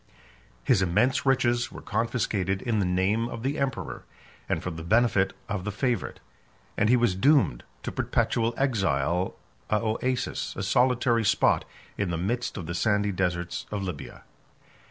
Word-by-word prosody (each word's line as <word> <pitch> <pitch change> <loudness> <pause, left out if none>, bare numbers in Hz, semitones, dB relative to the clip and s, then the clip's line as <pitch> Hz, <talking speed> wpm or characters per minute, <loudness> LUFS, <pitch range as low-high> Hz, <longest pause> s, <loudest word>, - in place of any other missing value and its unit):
His 115 -8 +3
immense 110 +10 +2
riches 120 -2 +2
were - - -8
confiscated 105 -4 -1
in 115 -4 0
the 95 - +1
name 100 +6 +1
of 115 -2 -6
the 140 +3 -1
emperor, 135 -1 -3 0.5
and - - -1
for 90 - -3
the 80 0 -7
benefit 105 +1 +3 0.2
of 100 -3 -3
the 105 - -3
favorite; 120 +4 -2 0.6
and 110 - +2
he 125 - +6
was 120 -5 +2
doomed 105 - +3 0.2
to - - -3
perpetual 115 0 0
exile 95 - 0 0.3
a - - +2
Oasis, 115 +4 -1
a - - -3
solitary 120 +2 +2
spot 100 - +3 0.3
in 100 -3 0
the 85 - -1
midst 115 +9 -2
of 90 - -5
the 85 - -4
sandy 105 +1 +1
deserts 90 -2 -2
of 105 -2 -3
Libya. 90 -7 -7
105 Hz, 155 wpm, -27 LUFS, 95-120 Hz, 0.6 s, he